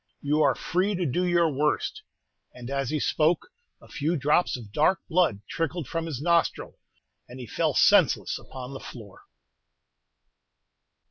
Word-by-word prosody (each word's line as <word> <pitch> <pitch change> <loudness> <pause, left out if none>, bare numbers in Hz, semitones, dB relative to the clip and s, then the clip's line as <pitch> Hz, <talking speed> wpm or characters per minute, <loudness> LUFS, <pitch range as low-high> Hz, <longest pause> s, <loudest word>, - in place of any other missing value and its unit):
You 150 +2 +1
are - - +3
free 190 +4 -1
to 180 -1 -1
do 160 +6 0
your 170 -1 +3
worst!" 150 0 -1 0.5
And 125 +1 -8
as 140 -2 -1
he 155 - -1
spoke, 160 - +1 0.3
a - - -17
few 160 +4 -1
drops 150 +2 +1
of 110 -5 -12
dark 155 - +2
blood 165 - +1
trickled 165 -2 -3
from 165 +2 -3
his 145 -6 -4
nostril, 170 +2 0 0.5
and 125 +2 -10
he 125 - -7
fell - - -1
senseless - - +4
upon 130 0 -9
the 135 - -7
floor. 105 -6 -12
150 Hz, 150 wpm, -26 LUFS, 130-170 Hz, 0.5 s, senseless